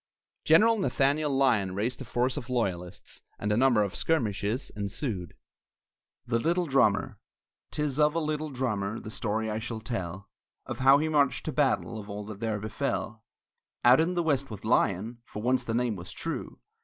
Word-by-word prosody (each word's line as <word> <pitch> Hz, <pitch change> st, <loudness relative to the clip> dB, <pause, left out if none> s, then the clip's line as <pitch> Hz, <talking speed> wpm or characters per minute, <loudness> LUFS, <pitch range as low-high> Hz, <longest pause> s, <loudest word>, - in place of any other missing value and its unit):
General 220 Hz, +8 st, +5 dB
Nathaniel 150 Hz, -4 st, +1 dB
Lyon 115 Hz, -9 st, +2 dB
raised 115 Hz, +7 st, -2 dB
a -, -, -6 dB
force 125 Hz, +2 st, 0 dB
of 130 Hz, -5 st, -6 dB
loyalists, 95 Hz, -7 st, -3 dB, 0.2 s
and 105 Hz, -, -2 dB
a -, -, +3 dB
number 120 Hz, -3 st, +4 dB
of 100 Hz, -2 st, -4 dB
skirmishes 115 Hz, -5 st, -1 dB
ensued. 100 Hz, -, -4 dB, 0.9 s
THE 115 Hz, -1 st, +1 dB
LITTLE 175 Hz, +6 st, +1 dB
DRUMMER 135 Hz, -8 st, +2 dB, 0.5 s
'Tis 150 Hz, -2 st, -2 dB
of 150 Hz, +1 st, +4 dB
a -, -, +2 dB
little 155 Hz, -1 st, -2 dB
drummer, 110 Hz, -6 st, -2 dB
The 110 Hz, -, -8 dB
story 110 Hz, 0 st, -2 dB
I 105 Hz, -, -2 dB
shall 115 Hz, 0 st, -5 dB
tell; 95 Hz, -4 st, -5 dB, 0.4 s
Of -, -, -6 dB
how 135 Hz, +1 st, +7 dB
he 155 Hz, +2 st, 0 dB
marched 140 Hz, -4 st, +2 dB
to 155 Hz, -, -2 dB
battle, 135 Hz, -5 st, +1 dB
Of 105 Hz, 0 st, -10 dB
all 105 Hz, 0 st, -5 dB
that 105 Hz, -1 st, -8 dB
there 110 Hz, -2 st, -1 dB
befell, 105 Hz, 0 st, -3 dB, 0.6 s
Out 125 Hz, +3 st, +7 dB
in 170 Hz, +3 st, +1 dB
the 175 Hz, -, +1 dB
west 140 Hz, -4 st, +1 dB
with 105 Hz, -3 st, -8 dB
Lyon 110 Hz, +1 st, +1 dB
(For 105 Hz, -3 st, -8 dB
once 125 Hz, 0 st, +2 dB
the 115 Hz, -, -2 dB
name 120 Hz, -2 st, +1 dB
was 90 Hz, -1 st, -8 dB
true!) 165 Hz, -, -5 dB
120 Hz, 180 wpm, -28 LUFS, 105-140 Hz, 0.9 s, how